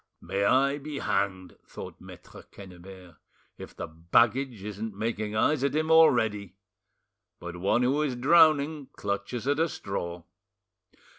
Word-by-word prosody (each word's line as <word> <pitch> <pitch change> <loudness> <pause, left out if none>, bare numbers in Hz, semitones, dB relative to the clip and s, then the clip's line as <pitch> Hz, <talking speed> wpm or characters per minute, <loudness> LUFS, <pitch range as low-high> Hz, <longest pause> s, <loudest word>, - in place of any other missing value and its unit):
"May 100 +1 -2
I 140 +4 +3
be 145 0 -7
hanged!" 95 -6 -2
thought - - -10
Maitre - - -13
Quennebert, 90 -2 -13 0.4
"if - - -10
the - - -5
baggage 110 +8 +1
isn't 105 0 -6
making 110 -1 -3
eyes 135 +5 +1
at 140 0 0
him 155 +1 0
already! 110 - +3 0.8
But 85 0 -8
one 100 +7 +1
who 135 +4 +1
is 140 -5 -1
drowning 150 +1 +3
clutches 105 +5 -4
at 145 +1 +1
a 165 +1 +2
straw." 90 - -5
110 Hz, 135 wpm, -27 LUFS, 95-140 Hz, 0.8 s, I